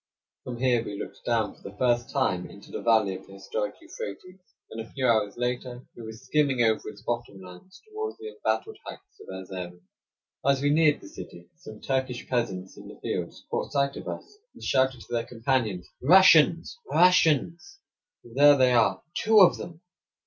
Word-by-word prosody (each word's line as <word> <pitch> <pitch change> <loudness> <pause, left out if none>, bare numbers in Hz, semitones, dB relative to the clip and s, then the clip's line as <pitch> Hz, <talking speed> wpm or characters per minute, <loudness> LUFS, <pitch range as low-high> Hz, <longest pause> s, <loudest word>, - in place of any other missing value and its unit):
From 125 -1 -6
here 120 -2 +2
we 105 -3 -6
looked - - -8
down 115 -3 +1
for - - -24
the 100 +1 -11
first 120 0 +1
time 95 -11 -1
into 100 - -14
the - - -5
valley 110 -4 +3
of 95 - -10
the 95 - -14
historic 105 +2 -4
Euphrates, 185 - -9 0.3
and 115 - -5
a 115 - -10
few 135 -2 -3
hours 110 -3 +1
later 125 0 -3
we - - -10
were 110 -1 -7
skimming 135 +3 0
over 110 -1 +1
its 105 0 -13
bottom 120 -5 -4
lands 95 - -14
toward 435 0 -5
the 435 0 -8
embattled 440 -1 -3
heights 390 +1 -12
of - - -14
Erzerum. 90 -2 -8 0.6
As 140 0 +3
we 145 +1 +1
neared 155 -1 +3
the - - -12
city, 85 -2 -11
some 110 -1 -12
Turkish 130 -2 -2
peasants 95 -7 -3
in - - -11
the - - -12
fields - - -5
caught - - -2
sight 140 -1 0
of - - -8
us, 415 +1 -8 0.2
and - - -13
shouted 130 -2 +1
to - - -15
their 115 -1 0
companions: 115 -6 -1
"Russians! 170 - +5
Russians! 175 - +3 0.5
There 140 +5 +5
they 130 -1 +4
are! 115 -2 +2
Two 220 0 +4
of 185 - +6
them!" 170 -1 -9
125 Hz, 185 wpm, -26 LUFS, 105-150 Hz, 0.6 s, of